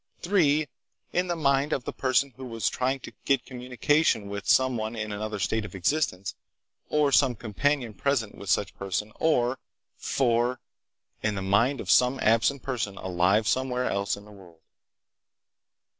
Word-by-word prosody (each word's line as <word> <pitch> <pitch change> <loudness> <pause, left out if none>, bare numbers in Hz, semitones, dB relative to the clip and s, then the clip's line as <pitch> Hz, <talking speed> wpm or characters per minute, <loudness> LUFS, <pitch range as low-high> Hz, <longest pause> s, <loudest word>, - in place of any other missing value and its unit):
"3. 155 -5 +3 0.5
In 180 +1 +1
the 175 - -1
mind 140 -1 +1
of 130 - -1
the - - -5
person 135 0 +1
who 130 - -8
was 115 -4 -1
trying 130 +2 -1
to - - -10
get 135 -3 +1
communication 125 -2 0
with 100 -1 -6
some 130 -1 +4
one 110 0 -3
in 110 -1 -4
another 105 +1 -4
state 110 +2 0
of 100 - -9
existence, 95 - 0 0.6
or 150 -2 +2
some 135 -3 +4
companion 120 +2 -1
present 115 0 -1
with 100 - -9
such 100 - +1
person, 100 +2 -4
or, 130 -5 +2 0.4
"4. 120 -1 +1 0.6
In 105 -1 0
the 95 - -3
mind 115 +8 +2
of - - -1
some 125 +2 +4
absent 115 +4 +2
person 115 -7 -3
alive 95 +4 +1
somewhere 125 0 0
else 100 -2 -1
in 100 - -13
the 105 - -14
world." 90 -5 -16
120 Hz, 160 wpm, -27 LUFS, 105-135 Hz, 0.6 s, some